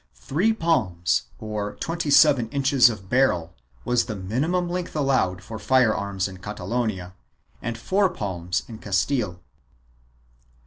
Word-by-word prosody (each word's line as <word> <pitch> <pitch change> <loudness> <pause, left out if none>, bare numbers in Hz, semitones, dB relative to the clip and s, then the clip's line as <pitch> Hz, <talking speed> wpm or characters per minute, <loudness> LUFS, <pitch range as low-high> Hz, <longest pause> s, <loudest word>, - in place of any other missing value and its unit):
Three 150 - 0
palms, 90 - +1
or 105 -1 -4
twenty 165 -2 -3
seven 140 -5 +5
inches 135 -2 +4
of 95 -4 -7
barrel, 95 -8 +1 0.3
was 125 -1 +2
the 110 - -5
minimum 140 - -1
length 175 -1 -4
allowed 130 -11 +1
for 110 +2 -7
fire 120 0 +3
arms 100 -2 -2
in 95 -1 -10
Catalonia 100 -1 -3 0.5
and 120 -1 -4
four 190 - +2
palms 90 - -3
in 110 -2 -9
Castile. 100 -1 -1
110 Hz, 130 wpm, -24 LUFS, 95-140 Hz, 0.5 s, seven